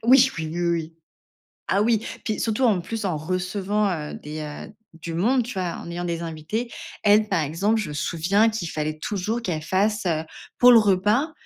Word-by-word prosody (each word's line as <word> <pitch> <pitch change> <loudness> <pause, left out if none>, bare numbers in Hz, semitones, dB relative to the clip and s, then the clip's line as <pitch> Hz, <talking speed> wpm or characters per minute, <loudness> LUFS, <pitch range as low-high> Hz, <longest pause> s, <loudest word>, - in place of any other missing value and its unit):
Oui, 255 +3 +6
oui, 160 - -2
oui, 175 +2 -3
oui. 165 -1 -2 0.8
Ah 200 +2 +2
oui, 225 0 +2 0.2
puis 215 - -1
surtout, 225 +3 0
en 210 -8 +3
plus, 220 +3 -4
en 180 -5 0
recevant, 190 +5 -1
heu, 150 -4 -4
des, 150 +1 -7
heu, 150 +7 -8 0.2
du 165 0 -7
monde, 240 +10 +2
tu 245 - -6
vois? 180 -3 -3
En 170 - -8
ayant 175 +1 -4
des 170 -1 -2
invités. 165 +9 -4 0.3
Elle, 210 +1 +5
par 185 -4 +2
exemple, 195 +10 0
je 210 - -3
me - - -5
souviens 180 +7 +2
qu'il 215 -7 -4
fallait 155 0 -3
toujours 210 +7 -2
qu'elle 170 -7 -2
fasse, 200 +6 0
heu, 160 -2 0 0.3
pour 250 0 +8
le 235 - +9
repas, 210 - +2
190 Hz, 200 wpm, -24 LUFS, 165-215 Hz, 0.8 s, le